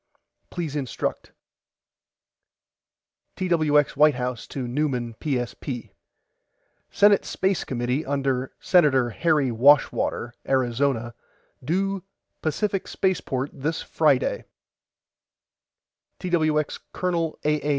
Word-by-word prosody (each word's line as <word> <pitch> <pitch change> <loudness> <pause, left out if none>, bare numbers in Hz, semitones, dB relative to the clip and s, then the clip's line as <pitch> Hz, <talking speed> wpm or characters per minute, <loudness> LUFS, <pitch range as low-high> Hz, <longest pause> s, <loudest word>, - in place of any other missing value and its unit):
PLEASE 165 -5 -4
INSTRUCT 135 -6 -3 2.1
TWX 155 -5 +3
WHITE 150 -2 +5
HOUSE 125 -2 -4
TO 130 -3 -5
NEUMAN 125 -3 -1
PSP: 125 -2 -3 1.0
SENATE 205 -1 +4
SPACE 190 -1 -1
COMMITTEE 125 +4 -2
UNDER 135 -2 -1
SENATOR 135 -9 +3
HARRY 150 -1 +1
WASHWATER 120 -1 +3
ARIZONA 125 -2 0 0.5
DUE 195 +6 0 0.4
PACIFIC 195 +4 -1
SPACEPORT 145 -8 -1
THIS 160 +4 -3
FRIDAY - - +1 1.7
TWX 155 -4 0
COL. 170 -3 -1
A. 150 0 +1
A. 150 - -2
145 Hz, 85 wpm, -24 LUFS, 125-170 Hz, 2.1 s, WHITE